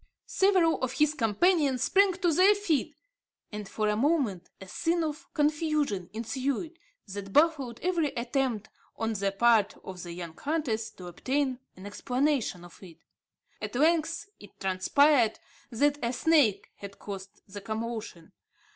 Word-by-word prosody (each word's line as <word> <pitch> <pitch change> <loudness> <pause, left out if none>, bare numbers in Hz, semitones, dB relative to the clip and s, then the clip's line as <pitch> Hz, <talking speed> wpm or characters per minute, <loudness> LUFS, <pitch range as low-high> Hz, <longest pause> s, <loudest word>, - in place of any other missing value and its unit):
Several 375 -4 +2
of 255 -1 -1
his 300 +2 +2
companions 280 - +2
sprang 395 -1 +4
to 350 -2 0
their 380 +6 +6
feet; 320 -7 -1 0.6
and, 210 -2 -6
for 215 -1 -1
a 210 - +1
moment, 235 - 0
a 190 - -10
scene 335 - 0
of 305 -1 -5
confusion 295 - 0
ensued 265 - -3 0.3
that 195 -1 -7
baffled 285 -4 +2
every 345 -3 +1
attempt 240 -3 -1 0.3
on 225 0 -2
the 200 -1 -1
part 220 0 +3
of 185 -1 -8
the 175 - -7
young 170 -2 -7
hunters 265 -8 -2
to 185 -4 -12
obtain 260 +8 -2 0.2
an 185 - -12
explanation 250 - -1
of 175 - -16
it. 175 -4 -13 0.6
At - - -5
length, 325 +6 +1
it 205 - -16
transpired 225 +6 +3 0.3
that 285 +4 +1
a 235 +1 0
snake 275 -5 +2
had 200 0 -10
caused 195 0 -9
the 205 +1 -8
commotion. 220 -4 -5
250 Hz, 145 wpm, -28 LUFS, 205-305 Hz, 0.6 s, their